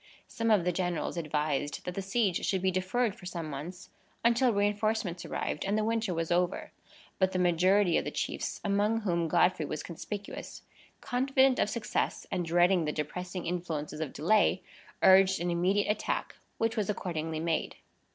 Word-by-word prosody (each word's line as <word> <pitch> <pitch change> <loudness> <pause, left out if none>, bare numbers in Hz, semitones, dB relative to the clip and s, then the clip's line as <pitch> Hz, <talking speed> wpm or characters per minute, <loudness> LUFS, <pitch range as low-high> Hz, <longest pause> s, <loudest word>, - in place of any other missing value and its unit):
Some 230 0 -2
of 210 -5 +4
the 180 - +1
generals 175 -2 -2
advised 150 -3 -2
that 180 - -3
the 195 - -3
siege 195 -1 0
should 190 -2 0
be 190 - +3
deferred 195 +5 0
for 180 - -10
some 170 -3 -4
months, 155 +6 -7 0.3
until 240 +2 +4
reinforcements 205 -3 0
arrived, 150 - -3
and 200 +2 0
the 215 - +1
winter 225 -2 0
was 165 -1 -2
over; 180 +1 0 0.5
but 190 -1 +2
the - - 0
majority 180 +1 +3
of - - -5
the - - -1
chiefs, - - -3
among 210 +2 +1
whom 170 -5 0
Godfrey 160 -1 +2
was 155 - -4
conspicuous, 200 +4 -7 0.4
confident 265 +1 +2
of - - +2
success, 225 -1 -2
and 180 - 0
dreading 175 +1 +3
the 150 - 0
depressing 180 +5 -4
influences 160 -4 -3
of 150 -4 -3
delay, 210 +7 +2 0.4
urged 190 0 +6
an 175 +1 -1
immediate 190 +4 +2
attack, 210 - -2 0.2
which 225 0 0
was 210 -3 -1
accordingly 160 -5 -3
made. 165 0 -1
185 Hz, 170 wpm, -30 LUFS, 170-210 Hz, 0.5 s, urged